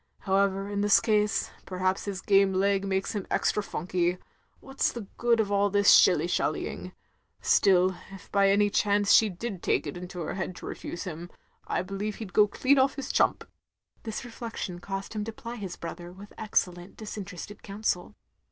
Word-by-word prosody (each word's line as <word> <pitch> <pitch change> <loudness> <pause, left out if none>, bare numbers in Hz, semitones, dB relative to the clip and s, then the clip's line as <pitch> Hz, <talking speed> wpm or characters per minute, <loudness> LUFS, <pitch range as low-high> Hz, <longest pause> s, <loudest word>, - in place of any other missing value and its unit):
However, 195 0 +1
in 200 0 -2
this 205 0 +5
case, 210 -1 +1
perhaps 185 +1 -1
his 195 -3 -4
game 195 -1 +4
leg 195 +1 +1
makes 190 0 -1
him 205 -3 -4
extra 210 - +1
funky. 180 -1 -1 0.4
What 270 0 -13
's - - +4
the 235 -4 -7
good 240 -1 +3
of 205 -2 0
all 200 0 +3
this 205 0 +5
shilly - - +6
shallying? - - -2 0.5
Still 185 -2 +4 0.2
if 195 - -12
by 200 -1 +4
any 205 +1 +3
chance 205 0 +2
she 220 - +6
did 195 0 -6
take - - +1
it - - -5
into 180 0 -7
her - - -3
head 185 -1 -4
to - - -10
refuse 175 - -6
him, 175 -2 -7 0.4
I - - -1
believe 195 +2 -4
he 225 - -6
*d 185 - -12
go 210 +2 +6
dean 265 +6 +2
off 265 +1 +3
his 275 - -4
chtmip. - - +2 0.3
" - - -42
This 220 +2 -5
reflection 225 -6 -6
caused, 195 +3 -5
him 210 -1 -2
to 225 - -5
ply 235 +2 -8
his 195 -5 -6
brother 175 +1 -8
with 200 +3 -13
excellent 180 -4 -2
disinterested 205 -2 -7
counsel. 200 -1 -3
200 Hz, 190 wpm, -28 LUFS, 185-210 Hz, 0.5 s, shilly